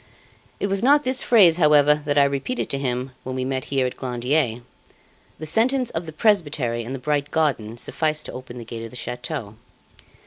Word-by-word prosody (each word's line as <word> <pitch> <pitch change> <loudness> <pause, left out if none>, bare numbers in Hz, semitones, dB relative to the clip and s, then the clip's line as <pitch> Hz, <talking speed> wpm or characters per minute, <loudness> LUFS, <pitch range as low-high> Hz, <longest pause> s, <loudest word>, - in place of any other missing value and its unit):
It - - -1
was 195 -1 -1
not 285 +4 +4
this 255 0 +1
phrase, 185 -9 +5
however, 150 -3 +5
that 145 0 0
I 140 - +7
repeated 140 - -2
to 140 - -1
him, 130 -1 -2
when 130 0 -5
we 130 0 -2
met 130 0 -2
here 135 -2 0
at 125 - -4
Glandier. 125 -1 -1 0.7
The 155 - -7
sentence 245 - +2
of 165 +1 -4
the - - -6
presbytery 150 - +1
and 125 +4 -5
the - - -4
bright 145 +2 -1
garden 130 -9 -1
sufficed 155 +4 -1
to - - -7
open 125 -1 -9
the 120 - -8
gate 115 0 -7
of 115 - -7
the 125 - -13
chateau. 125 -3 -5
140 Hz, 200 wpm, -23 LUFS, 125-160 Hz, 0.7 s, I